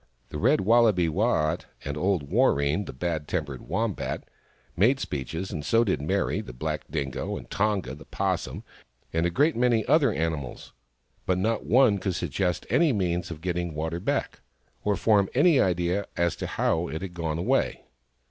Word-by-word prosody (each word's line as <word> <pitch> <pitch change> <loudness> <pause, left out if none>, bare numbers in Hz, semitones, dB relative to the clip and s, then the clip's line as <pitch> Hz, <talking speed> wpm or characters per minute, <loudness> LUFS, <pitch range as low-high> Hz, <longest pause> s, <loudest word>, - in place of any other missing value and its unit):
The 75 - -5
Red 135 - +3
Wallaby, 110 -4 +4
Waat, 85 -3 0 0.2
and 70 0 -3
old 90 0 +1
Warreen, 70 +8 +2
the - - -5
bad 75 +2 -3
tempered 75 -7 -3
Wombat, - - -2 0.5
made 120 +10 +3
speeches, 80 - -4
and 75 -6 -4
so 115 +9 +3
did 95 -9 0
Meri, 75 - 0
the 65 - -10
black - - -3
Dingo, 70 -3 -3
and - - -10
Tonga, 100 -10 0
the 70 - -11
'Possum, - - -2 0.5
and 80 +1 +2
a - - 0
great 145 - +2
many 120 -2 +2
other 150 -6 +4
animals. 80 -7 -3 0.5
But 90 - +2
not 110 +4 -1
one 120 -5 +5
could 95 -2 -2
suggest 90 +2 -1
any 140 - +3
means 90 -5 -1
of 80 -2 -7
getting 85 -2 -2
water 80 +2 -2
back, 90 - -2 0.4
or 105 -1 +1
form 100 -3 +3
an 145 - +4
idea 95 - +2
as 85 -1 +1
to - - -4
how 85 +2 0
it 80 +6 -5
had 95 -2 -6
gone 80 -2 -2
away. 85 - 0
90 Hz, 170 wpm, -26 LUFS, 80-105 Hz, 0.5 s, one